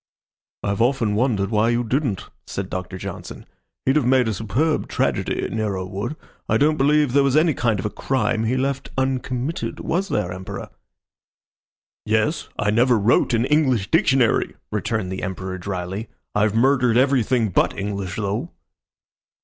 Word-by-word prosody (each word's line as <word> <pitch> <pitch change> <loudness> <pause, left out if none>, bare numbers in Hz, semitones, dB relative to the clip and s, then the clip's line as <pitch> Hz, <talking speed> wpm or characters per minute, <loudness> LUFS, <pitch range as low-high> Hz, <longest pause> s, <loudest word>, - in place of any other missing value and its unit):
"I've 100 +2 -1
often 120 -3 +2
wondered 105 -3 +1
why 110 +1 +3
you 120 +1 +1
didn't," 120 - -1 0.2
said 100 -1 -5
Doctor 95 +1 -4
Johnson. - - -7 0.4
"He'd 135 +3 +3
have 145 - +2
made 130 -2 +4
a 110 - 0
superb 120 +10 0
tragedy, - - -1
Nero 105 -4 -2
would. 100 +10 -4 0.3
I - - +4
don't 155 +2 +3
believe 145 -1 +3
there 140 - +5
was 140 +1 +3
any 160 0 +4
kind 115 -5 0
of 95 - -4
a 105 - -1
crime 115 -4 0
he 125 +4 +1
left 135 +1 -2
uncommitted. 130 +2 -2
Was 190 +4 -1
there, 95 -4 -1
Emperor?" 95 +1 -7 1.3
"Yes. 110 +9 0
I 105 - +1
never 120 +2 +4
wrote 115 +3 +3
an 115 +2 +2
English 130 -9 +2
dictionary," 135 -7 +3 0.2
returned 105 -1 -2
the 95 - -4
Emperor, 95 0 -4
dryly. 95 +3 -4 0.2
"I've 105 0 +2
murdered 125 -1 +3
everything 125 -4 +2
but 90 - +1
English, 100 -2 -3
though." 100 -1 -2
115 Hz, 155 wpm, -22 LUFS, 100-135 Hz, 1.3 s, there